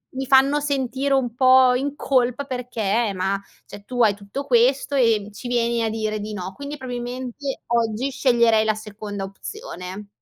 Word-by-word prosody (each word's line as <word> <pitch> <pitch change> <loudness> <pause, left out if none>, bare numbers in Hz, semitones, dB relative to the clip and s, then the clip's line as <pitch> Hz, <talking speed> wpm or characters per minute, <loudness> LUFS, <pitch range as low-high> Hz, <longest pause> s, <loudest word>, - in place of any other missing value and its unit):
mi 265 0 -3
fanno 275 +2 +5
sentire 275 -1 -1
un 245 -4 0
pò 255 0 +6
in 275 +3 -2
colpa 255 -2 +1
perché 235 -4 -1
ma 195 +2 -1 0.2
cioè, 205 0 -12
"Tu 245 +1 +1
hai 210 -2 +4
tutto 205 +8 -6
questo, 265 +2 +3
e 225 -6 +2
ci 225 - -8
vieni 235 -1 +1
a 225 - 0
dire 215 -1 -2
di 210 +1 -5
no". 185 -2 -5
Quindi, 285 +6 -7
probabilmente 255 +1 -5
oggi 235 +2 0
sceglierei 235 -5 +3
la 215 -1 +2
seconda 210 -1 -7
opzione. 195 - -8
240 Hz, 165 wpm, -22 LUFS, 215-265 Hz, 0.2 s, pò